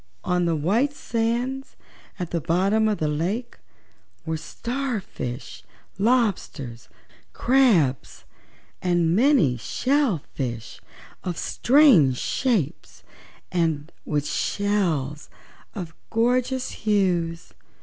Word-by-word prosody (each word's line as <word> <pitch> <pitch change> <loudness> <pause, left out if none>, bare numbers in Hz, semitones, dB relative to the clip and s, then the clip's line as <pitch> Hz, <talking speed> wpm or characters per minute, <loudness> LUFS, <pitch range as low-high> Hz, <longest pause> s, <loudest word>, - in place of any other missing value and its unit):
On 180 -1 +1
the 165 -1 +1
white 215 - +1
sands 240 +2 -2 0.4
at 180 -3 -5
the 170 - -1
bottom 195 +7 +2
of 210 -2 +1
the 155 - -1
lake 185 +11 -2 0.7
were 160 0 -1
star 245 - -3
fish, 125 -8 -7 0.4
lobsters, 195 - 0 0.4
crabs 220 - +2 0.6
and 175 -2 +2
many 230 - +4
shell 255 - 0
fish 120 -4 -5 0.4
of 175 -2 -3
strange 235 - +5
shapes 225 - -1 0.5
and 165 -3 0
with 150 -1 -1
shells 170 -11 -1 0.5
of 175 -5 -6 0.2
gorgeous 250 +3 +1
hues. 180 -6 0
185 Hz, 95 wpm, -24 LUFS, 155-235 Hz, 0.7 s, strange